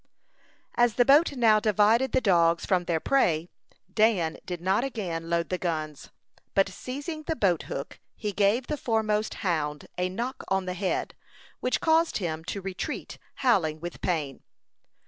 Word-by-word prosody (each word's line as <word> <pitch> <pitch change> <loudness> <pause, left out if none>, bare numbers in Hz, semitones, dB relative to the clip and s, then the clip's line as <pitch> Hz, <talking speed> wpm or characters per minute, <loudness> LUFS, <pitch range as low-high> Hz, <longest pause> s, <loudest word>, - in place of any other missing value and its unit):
As 240 -2 +3
the 245 - +4
boat 290 +6 +6
now 225 -5 +4
divided 215 +4 +3
the 260 - +2
dogs 170 -5 +3
from 180 -2 +1
their 165 -2 0
prey, 170 - +1 0.4
Dan 200 -8 +2
did 180 -2 -4
not 190 +6 +1
again 175 -11 -4
load 170 0 0
the 185 - -2
guns; 155 -4 -4 0.5
but 195 0 +4
seizing 280 - -6
the 320 +1 -3
boat 185 - +2
hook, - - -6 0.2
he 210 -2 -3
gave 205 +5 +2
the 300 - -3
foremost 220 -3 0
hound 150 -4 -1
a 180 0 +1
knock 235 +7 -4
on 190 -1 0
the 180 - -3
head, 185 +1 -2 0.5
which 250 - 0
caused 325 +1 +3
him 160 -4 -3
to 200 - -4
retreat, 190 -1 -5 0.3
howling 160 -11 +2
with 175 +1 -7
pain. 155 -7 -2
195 Hz, 160 wpm, -27 LUFS, 170-235 Hz, 0.5 s, boat